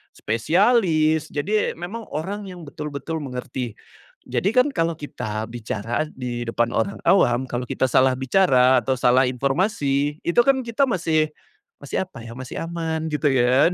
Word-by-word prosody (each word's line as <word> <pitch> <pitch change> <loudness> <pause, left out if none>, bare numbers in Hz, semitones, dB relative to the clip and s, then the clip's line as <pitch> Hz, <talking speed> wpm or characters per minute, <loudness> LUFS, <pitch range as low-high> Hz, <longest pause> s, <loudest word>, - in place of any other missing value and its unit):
spesialis, 160 - +2
jadi 205 +9 0
memang 200 +7 -6
orang 200 +7 -4
yang 180 -2 -9
betul-betul 150 +2 -5
mengerti. 125 -3 -5 0.5
Jadi, 195 - 0
kan, 255 +3 +5
kalau 165 -4 0
kita 110 -8 -5
bicara 115 +3 -3
di 120 -2 -4
depan 115 0 0
orang 200 - 0
awam, 125 -10 +4
kalau 120 0 -3
kita - - -2
salah 130 +1 +4
bicara 130 -3 +4
atau 130 +4 0
salah 125 +1 +4
informasi 140 - 0
itu 170 - +2
kan 270 -1 +4
kita 235 +4 +1
masih 160 -6 +1 0.5
masih 145 +6 -2
apa 185 - -12
ya, 115 - -8
masih 130 -1 -6
aman 165 -1 -3
gitu 150 0 +1
ya 130 +2 +4
kan, - - -4
145 Hz, 155 wpm, -23 LUFS, 125-175 Hz, 0.5 s, kan